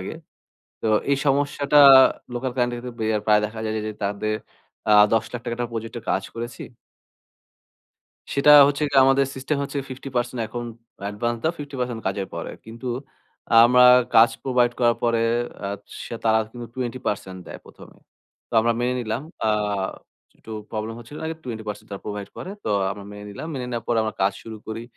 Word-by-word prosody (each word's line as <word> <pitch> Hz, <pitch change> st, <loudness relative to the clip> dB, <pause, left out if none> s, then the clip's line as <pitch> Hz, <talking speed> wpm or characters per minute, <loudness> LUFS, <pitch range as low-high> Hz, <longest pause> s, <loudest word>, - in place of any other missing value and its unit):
আগে। -, -, -6 dB, 0.7 s
তো -, -, -1 dB, 0.2 s
এই 140 Hz, -, +3 dB
সমস্যাটা 140 Hz, +1 st, +3 dB, 0.6 s
লোকাল 130 Hz, +1 st, -2 dB
ক্লায়েন্টদের 120 Hz, -1 st, -1 dB
ক্ষেত্রে 110 Hz, -3 st, -2 dB
প্রায় 105 Hz, 0 st, +5 dB
দেখা 110 Hz, +1 st, -7 dB
যায় 110 Hz, -, -2 dB
যে 110 Hz, -, -2 dB
যে 110 Hz, -, -4 dB
তাদের 105 Hz, +2 st, -1 dB, 0.5 s
অ্যা 105 Hz, -, +6 dB, 0.2 s
৳১০,০০০০ 115 Hz, +2 st, -1 dB
টাকার 120 Hz, 0 st, -3 dB
একটা 120 Hz, -1 st, -2 dB
প্রজেক্টর 115 Hz, 0 st, -5 dB
কাজ 95 Hz, -, 0 dB
করেছি 120 Hz, +1 st, -6 dB, 1.7 s
সেটা 140 Hz, +1 st, +4 dB, 0.2 s
হচ্ছে 145 Hz, +1 st, -1 dB
যে -, -, +1 dB
আমাদের 135 Hz, +1 st, +4 dB
সিস্টেম 135 Hz, +3 st, -2 dB
হচ্ছে 140 Hz, 0 st, -4 dB
50% 125 Hz, -2 st, -3 dB
এখন 120 Hz, +2 st, -5 dB, 0.4 s
অ্যাডভান্স 115 Hz, +4 st, -2 dB
দেও, 160 Hz, -, +1 dB
50% 125 Hz, -5 st, -4 dB
কাজের 95 Hz, 0 st, -1 dB
পরে। -, -, -5 dB
কিন্তু 115 Hz, +3 st, -7 dB, 0.8 s
আমরা 125 Hz, +1 st, +6 dB, 0.3 s
কাজ 115 Hz, +2 st, +7 dB
প্রোভাইড 125 Hz, -2 st, +2 dB
করার 120 Hz, -2 st, +4 dB
পরে 115 Hz, -1 st, +2 dB, 0.4 s
আ -, -, -2 dB, 0.4 s
সে -, -, -6 dB
তারা 110 Hz, 0 st, +4 dB
কিন্তু 120 Hz, -1 st, -7 dB
20% 120 Hz, -7 st, -4 dB
দেয় -, -, -8 dB
১ম -, -, -14 dB
এ। -, -, -29 dB, 0.5 s
তো -, -, -30 dB
আমরা 115 Hz, +1 st, +2 dB
মেনে 125 Hz, +1 st, 0 dB
নিলাম। 115 Hz, +2 st, -3 dB, 0.2 s
আ -, -, +3 dB, 0.9 s
একটু 110 Hz, -, -11 dB, 0.2 s
প্রবলেম 110 Hz, +1 st, -4 dB
হচ্ছিল 120 Hz, +5 st, -11 dB
আগে 160 Hz, -, -3 dB
20% 110 Hz, -4 st, -6 dB
তারা 100 Hz, -, -7 dB
প্রোভাইড 105 Hz, -1 st, -5 dB
করে। 185 Hz, -, -6 dB
তো -, -, -1 dB, 0.2 s
আমরা 100 Hz, 0 st, -7 dB
মেনে 105 Hz, 0 st, -9 dB
নিলাম। 100 Hz, +10 st, -7 dB
মেনে 125 Hz, -2 st, -4 dB
নেওয়ার 120 Hz, -2 st, -4 dB
পরে 120 Hz, -, +2 dB
আমরা 110 Hz, -, -3 dB
কাজ 95 Hz, +1 st, +3 dB
শুরু 110 Hz, -1 st, -8 dB
করি। 110 Hz, +1 st, -5 dB
120 Hz, 170 wpm, -23 LUFS, 110-125 Hz, 1.7 s, কাজ